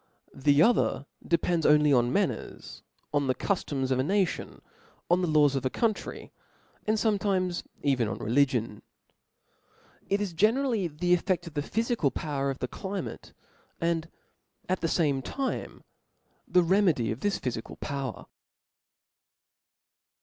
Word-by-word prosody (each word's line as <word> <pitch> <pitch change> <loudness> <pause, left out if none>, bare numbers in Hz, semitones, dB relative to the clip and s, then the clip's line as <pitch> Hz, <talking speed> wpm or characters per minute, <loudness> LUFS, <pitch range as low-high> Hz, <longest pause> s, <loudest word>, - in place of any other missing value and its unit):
The 145 +2 +4
other 225 - +2 0.2
depends 170 0 +1
only 150 -1 +5
on 120 -1 +3
man - - +3
ners, - - -9 0.3
on 145 -2 +1
the 130 - +1
cuftoms 140 -9 -1
of 130 - +2
a - - +2
nation, 190 +3 -1 0.5
on 180 +1 +4
the 180 - +1
laws 150 -3 +4
of 135 - 0
the 130 - 0
country, 220 - -2 0.6
and 215 +1 +2
fometimes 195 -5 0 0.2
even 130 -5 +2
on 100 0 -3
religion 120 -2 +1 0.6
*. - - -34
It 200 - +2
is 200 -4 -3
generally 220 +2 +2
the 175 +3 +2
effcft 180 0 -1
of 170 - -9
the 145 - -1
phyfical 225 - 0
power 140 -3 -2
of 135 - -3
the 125 - -3
climate; 190 +5 -6 0.5
and 165 -1 -1 0.6
at 185 0 -1
the 165 - +1
fame 150 -5 +1
time, 270 - -4 0.6
the 180 - +4
remedy 170 - +2
of 110 - -4
this 205 +4 0
phyfical 120 -3 -5
power. 135 -4 -4
160 Hz, 140 wpm, -28 LUFS, 135-190 Hz, 0.6 s, only